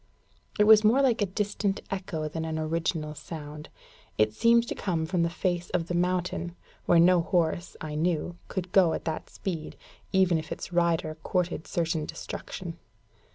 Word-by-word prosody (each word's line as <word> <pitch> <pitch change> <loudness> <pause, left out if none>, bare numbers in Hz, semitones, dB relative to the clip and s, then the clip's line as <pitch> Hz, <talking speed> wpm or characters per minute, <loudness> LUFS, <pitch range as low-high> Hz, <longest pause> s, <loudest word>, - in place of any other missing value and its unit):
It 210 - +5
was 215 0 +8
more 225 +5 +5
like 240 -4 +3
a 205 - +2
distant 205 0 -1
echo 175 -5 -3
than 160 +1 -4
an 160 -1 -3
original 160 -1 -1
sound. 150 -1 -8 0.5
It 110 0 +3
seemed 235 - +4
to - - -2
come 170 -5 -1
from 175 +1 0
the 170 - +2
face 175 0 -2
of 170 -1 -1
the - - -1
mountain, 175 -1 -1 0.3
where 175 - +5
no 175 +1 +6
horse, 170 0 0
I 155 -1 -5
knew, 170 +2 0
could 180 -2 -4
go 180 -4 +5
at - - -4
that 160 -1 -3
speed, 170 -6 -5 0.4
even 185 -3 +3
if 155 - -9
its - - -6
rider 170 -2 +1
courted 180 -2 -1
certain 165 -2 -1
destruction. 170 -3 -7
175 Hz, 170 wpm, -28 LUFS, 160-185 Hz, 0.5 s, was